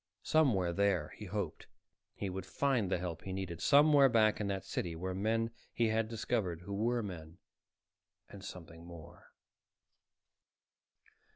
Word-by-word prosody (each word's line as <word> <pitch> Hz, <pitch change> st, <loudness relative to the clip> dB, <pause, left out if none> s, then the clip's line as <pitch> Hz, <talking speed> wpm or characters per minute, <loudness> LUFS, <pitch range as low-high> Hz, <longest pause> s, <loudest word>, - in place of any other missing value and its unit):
Somewhere 110 Hz, -, +3 dB
there, 95 Hz, -5 st, +1 dB
he 105 Hz, -, -10 dB
hoped, 95 Hz, -4 st, -4 dB, 0.5 s
he 100 Hz, -, -4 dB
would 95 Hz, 0 st, -5 dB
find 130 Hz, -7 st, +1 dB
the 95 Hz, -, +1 dB
help 85 Hz, -2 st, -5 dB
he 95 Hz, -, -6 dB
needed. 95 Hz, -3 st, -4 dB
Somewhere 145 Hz, -1 st, +6 dB
back 110 Hz, -3 st, +3 dB
in 105 Hz, -, -1 dB
that 95 Hz, -1 st, -3 dB
city 85 Hz, -2 st, -3 dB
were 90 Hz, +3 st, -3 dB
men 115 Hz, +4 st, 0 dB, 0.2 s
he 115 Hz, -1 st, +1 dB
had 110 Hz, 0 st, +1 dB
discovered 110 Hz, -6 st, -2 dB
who 100 Hz, +3 st, -7 dB
were 115 Hz, +3 st, 0 dB
men 85 Hz, -4 st, -8 dB, 0.9 s
and 100 Hz, -1 st, -11 dB
something 85 Hz, -4 st, -9 dB
more. 85 Hz, -3 st, -13 dB
100 Hz, 145 wpm, -34 LUFS, 90-115 Hz, 0.9 s, Somewhere